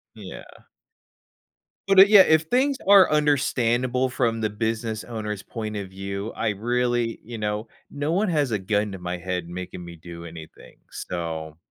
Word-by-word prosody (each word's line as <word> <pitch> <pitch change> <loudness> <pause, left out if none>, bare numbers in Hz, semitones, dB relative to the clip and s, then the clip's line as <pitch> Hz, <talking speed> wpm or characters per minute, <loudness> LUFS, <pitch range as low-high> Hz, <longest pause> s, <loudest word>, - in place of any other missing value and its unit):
Yeah. - - -9 1.5
But, 195 -1 +6
it 195 +1 +9
yeah, 210 -2 +9
if 160 -3 +4
things 260 - +1
are 200 -2 +7
understandable 130 -4 +1
from 115 -3 -1
the 110 - 0
business 110 +1 -3
owner's 105 -4 -5
point 110 -2 -6
of 100 -2 -6
view, 100 +3 -5
I 110 - -1
really 120 +2 -1
you 115 +1 -8
know, 105 +1 -3 0.2
no 145 +2 -2
one 200 +5 +1
has 150 -5 +1
a 105 - +1
gun 105 +2 -1
to - - -6
my 90 0 -4
head 90 -1 -4
making 90 0 -7
me 85 0 -10
do 85 +1 -10
anything, 80 -1 -12
so 80 -3 -5
110 Hz, 165 wpm, -24 LUFS, 95-130 Hz, 1.5 s, it